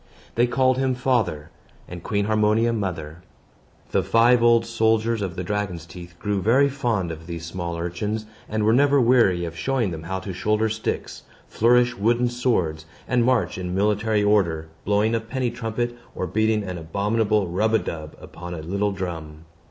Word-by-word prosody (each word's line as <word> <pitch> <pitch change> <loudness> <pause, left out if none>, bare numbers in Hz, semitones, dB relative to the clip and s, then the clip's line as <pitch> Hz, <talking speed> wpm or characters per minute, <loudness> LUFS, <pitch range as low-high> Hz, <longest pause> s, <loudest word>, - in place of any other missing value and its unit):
They 120 +1 +3
called 130 +1 +2
him 130 -1 +1
father, 120 - 0 0.4
and 90 -1 -8
Queen 100 +2 -1
Harmonia 110 +2 +2
mother. 85 -6 -4 0.7
The - - +2
five 120 +1 +4
old 115 -1 +4
soldiers 115 -1 +1
of 95 -3 -3
the 90 - -4
dragon's 90 -3 -3
teeth 85 0 -11
grew 100 +1 -1
very 130 +8 +4
fond 120 -10 -1
of 80 +1 -9
these 85 -2 -6
small 85 0 -4
urchins, 105 +6 -3 0.2
and 110 0 -1
were 110 +1 +4
never 140 +2 +4
weary 115 -8 +3
of 85 0 -6
showing 120 +2 0
them 80 -2 -5
how 90 +4 -4
to 95 0 -6
shoulder 105 +4 +1
sticks, 110 +1 -4 0.3
flourish 120 +1 +3
wooden 120 +4 +2
swords, 90 -11 -1 0.2
and 125 -2 +2
march 115 -8 +1
in 90 0 -3
military 105 +1 +1
order, 85 -7 +1 0.2
blowing 105 +3 +2
a 115 - +2
penny 120 +2 -3
trumpet, 120 0 -3 0.2
or - - -2
beating 110 +3 +1
an 90 -3 -5
abominable 105 +5 0
rub 105 +6 +1
a - - +6
dub 75 -6 -6
upon 90 0 -8
a 80 - -6
little 100 +5 -1
drum. 80 -5 -6
105 Hz, 175 wpm, -23 LUFS, 90-115 Hz, 0.7 s, a